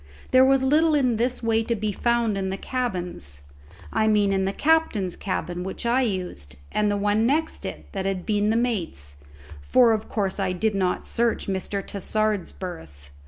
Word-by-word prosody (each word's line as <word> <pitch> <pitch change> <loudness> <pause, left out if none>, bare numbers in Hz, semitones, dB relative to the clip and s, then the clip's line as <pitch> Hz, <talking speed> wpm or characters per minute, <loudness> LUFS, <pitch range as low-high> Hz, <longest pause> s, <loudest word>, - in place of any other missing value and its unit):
There 255 0 +7
was 265 0 +4
little 305 +4 +4
in 255 -6 +2
this 245 +2 -1
way 225 0 +2
to 230 +1 -1
be 215 0 -2
found 235 0 +1
in 190 -1 -2
the 190 - -3
cabins: 180 - -4 0.5
I 220 0 +2
mean 205 -2 +3
in 190 0 +1
the 195 - 0
captain's 265 - +1
cabin 180 -2 -3
which 190 +5 -6
I 240 +3 +3
used, 180 - -3 0.2
and 210 0 +1
the 205 - +1
one 210 +2 +2
next 315 +4 0
it - - -7
that 195 -2 -2
had 190 -2 -2
been 210 -1 +1
the 220 - +2
mate's, 165 - -2 0.4
for 230 - +4
of 215 -1 -3
course 200 -2 -1
I 190 -2 0
did 215 +4 0
not 185 -2 0
search 235 -1 0
Mr. 195 +1 -2
Tassard's 210 0 -1
berth. 75 - -9
210 Hz, 185 wpm, -24 LUFS, 190-235 Hz, 0.5 s, There